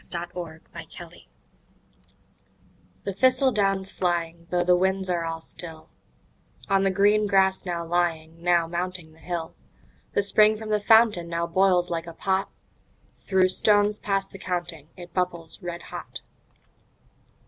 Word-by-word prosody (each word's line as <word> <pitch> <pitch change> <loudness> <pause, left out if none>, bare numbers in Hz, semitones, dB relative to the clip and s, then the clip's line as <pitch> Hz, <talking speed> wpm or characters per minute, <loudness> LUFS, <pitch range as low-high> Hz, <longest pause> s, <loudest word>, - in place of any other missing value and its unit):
Autumn 170 -2 -6 2.4
The 195 - -3
thistle 260 +5 +3
down's 195 -3 0
flying, 170 -2 -2
though 175 0 +1
the 180 0 +4
winds 190 +1 0
are 170 -1 -1
all 165 0 -4
still, 160 -1 -7 0.8
On 195 -1 +2
the 195 - +3
green 205 +2 +3
grass 190 -1 +2
now 170 -2 -3
lying, 165 -1 -1
now 175 -1 +3
mounting 175 -1 -5
the 160 - -21
hill, 165 0 -5 0.6
The 200 - +2
spring 215 +2 +4
from 220 0 -8
the 210 -1 +1
fountain 220 -5 +4
now 170 0 -1
boils 180 0 +2
like 165 0 -3
a 170 - -7
pot; 190 +2 -1 0.8
Through 190 -1 +3
stones 205 +2 +3
past 195 -1 -1
the 195 - -11
counting 175 -5 -4
it 175 -1 -11
bubbles 170 -2 -3
red 175 -1 -6
hot. - - -8
180 Hz, 135 wpm, -25 LUFS, 170-195 Hz, 2.4 s, the